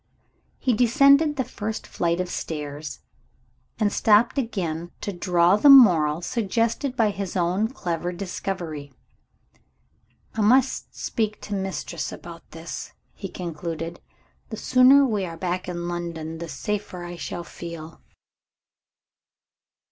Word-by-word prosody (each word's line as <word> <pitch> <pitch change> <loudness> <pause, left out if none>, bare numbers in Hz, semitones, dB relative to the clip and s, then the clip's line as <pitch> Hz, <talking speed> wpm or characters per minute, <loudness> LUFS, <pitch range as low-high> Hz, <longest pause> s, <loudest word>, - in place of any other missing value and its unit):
He 255 - +1
descended 280 +6 +5
the 260 - 0
first 220 -2 -5
flight 170 0 -1
of 180 - -1
stairs, 150 -3 -5 0.8
and 210 -2 +1
stopped 225 +5 +4
again 175 -9 -3
to 205 - -3
draw 175 +1 +3
the 285 - +5
moral 175 - +7
suggested 230 +6 -1
by 220 -4 +3
his 195 -2 -4
own 180 +5 +1
clever 175 -8 -3
discovery. 175 -5 -5 1.4
"I 220 - -2
must 255 +5 +2
speak 215 -3 -2
to 205 - -6
Mistress 190 -4 -3
about 170 -1 -11
this," 165 +1 -7 0.2
he 195 - -7
concluded. 165 -1 -5 0.5
"The 220 - -6
sooner 260 +4 +6
we 215 -6 0
are 165 -2 -6
back 180 +1 -3
in 175 -1 -4
London, 165 -2 -5
the 170 0 -6
safer 205 -2 -4
I 175 0 -7
shall 170 +1 -5
feel." 170 -2 -9
180 Hz, 125 wpm, -24 LUFS, 170-220 Hz, 1.4 s, moral